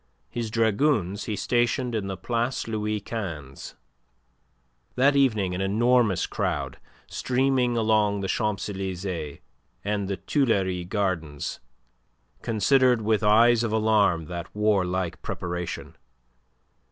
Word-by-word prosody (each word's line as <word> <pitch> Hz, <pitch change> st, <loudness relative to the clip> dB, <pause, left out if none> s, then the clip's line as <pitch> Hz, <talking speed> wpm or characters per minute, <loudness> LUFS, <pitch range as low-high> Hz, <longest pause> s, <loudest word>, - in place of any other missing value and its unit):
His 115 Hz, -2 st, -3 dB
dragoons 110 Hz, -, +1 dB
he 105 Hz, -, -2 dB
stationed 120 Hz, +4 st, 0 dB
in 105 Hz, -3 st, -2 dB
the 95 Hz, -1 st, -4 dB
Place 120 Hz, +7 st, -2 dB
Louis 105 Hz, -1 st, -1 dB
XV. 85 Hz, -, -6 dB, 1.2 s
That 140 Hz, +3 st, +4 dB
evening 110 Hz, -9 st, +2 dB
an 90 Hz, -, -3 dB
enormous 110 Hz, +1 st, +2 dB
crowd, -, -, -3 dB, 0.3 s
streaming 125 Hz, -1 st, +1 dB
along 105 Hz, -2 st, +2 dB
the 95 Hz, -, -2 dB
Champs 105 Hz, -1 st, -1 dB
Elysees 95 Hz, -6 st, -4 dB, 0.5 s
and 105 Hz, -1 st, -1 dB
the 100 Hz, -1 st, -2 dB
Tuileries 95 Hz, -, 0 dB
Gardens, 90 Hz, -8 st, -2 dB, 0.8 s
considered 125 Hz, +1 st, +3 dB
with 110 Hz, 0 st, +2 dB
eyes 115 Hz, +3 st, +5 dB
of 115 Hz, -, -1 dB
alarm 105 Hz, -6 st, +2 dB
that 85 Hz, +2 st, -6 dB
warlike 95 Hz, -4 st, 0 dB
preparation. 90 Hz, -1 st, -5 dB
105 Hz, 110 wpm, -25 LUFS, 95-115 Hz, 1.2 s, eyes